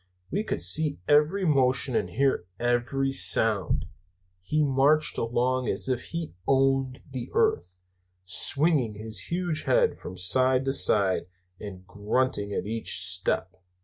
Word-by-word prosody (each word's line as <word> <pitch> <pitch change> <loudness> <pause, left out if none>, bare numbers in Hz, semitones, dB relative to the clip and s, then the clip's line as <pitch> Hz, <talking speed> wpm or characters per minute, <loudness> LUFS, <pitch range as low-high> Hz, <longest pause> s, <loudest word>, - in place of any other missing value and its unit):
We 205 - -1
could - - -3
see 155 -2 +3
every 150 +6 +2
motion 130 -4 +2
and 90 - -1
hear 130 -4 -1
every 120 +3 -1
sound. - - +1 0.6
He 150 +12 0
marched 145 +2 +2
along 125 +2 -1
as - - -2
if 125 -2 -2
he 165 - -6
owned 135 -1 +1
the 125 -2 -6
earth, 90 +2 0 0.5
swinging 135 - +2
his 110 +1 -6
huge 175 -3 -2
head - - +1
from 95 - -7
side 130 +8 +2
to 135 - 0
side 100 -9 +2 0.3
and 95 -3 -10
grunting 105 +1 -2
at 100 - -3
each 110 +2 0
step. 95 - -1
130 Hz, 135 wpm, -26 LUFS, 110-145 Hz, 0.6 s, see